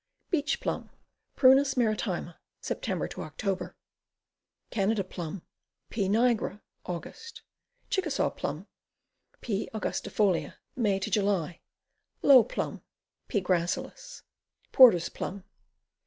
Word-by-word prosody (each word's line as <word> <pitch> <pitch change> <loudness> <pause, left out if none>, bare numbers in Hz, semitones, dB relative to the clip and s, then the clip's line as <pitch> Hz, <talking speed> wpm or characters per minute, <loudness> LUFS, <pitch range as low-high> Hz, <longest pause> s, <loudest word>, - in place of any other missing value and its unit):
Beach 335 +8 0
Plum. - - -3 0.5
Prunus 270 +1 +5
maritima. 215 -7 -1 0.2
Sep. - - -4
Oct. 185 +5 -3 1.0
Canada 205 -1 +1
Plum. 175 -1 -7 0.5
P. 200 -4 0
nigra. 225 -2 +2 0.3
Aug. 175 -2 -5 0.8
Chickasaw 355 -8 0
Plum. - - -5 0.8
P. 210 -3 -2
angusiifolia. 205 -3 0 0.2
May 205 -6 +1
July. 195 -4 0 0.6
Low 265 -4 +8
Plum. 225 - -4 0.5
P. 205 - 0
gracilis. 185 - -2 0.5
Porter's 225 -10 +7
Plum. 195 0 -6
205 Hz, 85 wpm, -28 LUFS, 185-255 Hz, 1.0 s, Low